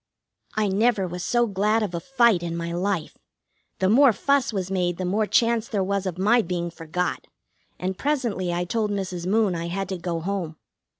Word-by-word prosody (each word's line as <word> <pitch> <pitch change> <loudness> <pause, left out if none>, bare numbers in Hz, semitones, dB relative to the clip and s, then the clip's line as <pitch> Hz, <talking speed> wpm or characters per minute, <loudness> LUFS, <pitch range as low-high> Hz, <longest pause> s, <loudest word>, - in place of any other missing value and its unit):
I 215 -1 +1
never 205 +1 +2
was 180 0 -5
so 240 0 +2
glad 210 +2 +1
of 195 -4 -3
a 170 - -2
fight 235 -2 +3
in 170 -1 -3
my 170 0 -3
life. 180 -1 -2 0.6
The 190 - +1
more 255 +6 +6
fuss 280 +4 +1
was 190 -3 -3
made 175 -2 0
the 185 - -3
more 210 +4 +1
chance 230 -1 +2
there 200 -4 -1
was 200 0 -1
of 180 -2 -4
my 215 +6 +4
being 175 -2 -3
forgot, 170 +2 -3 0.5
and 185 +1 -3
presently 240 -11 -1
I 175 +1 -1
told 215 +3 -1
Mrs. 185 -3 -3
Moon 210 -1 +2
I 170 0 -3
had 195 +2 -3
to 190 -2 -3
go 170 -1 -2
home. 175 -2 -3
190 Hz, 195 wpm, -24 LUFS, 175-220 Hz, 0.6 s, more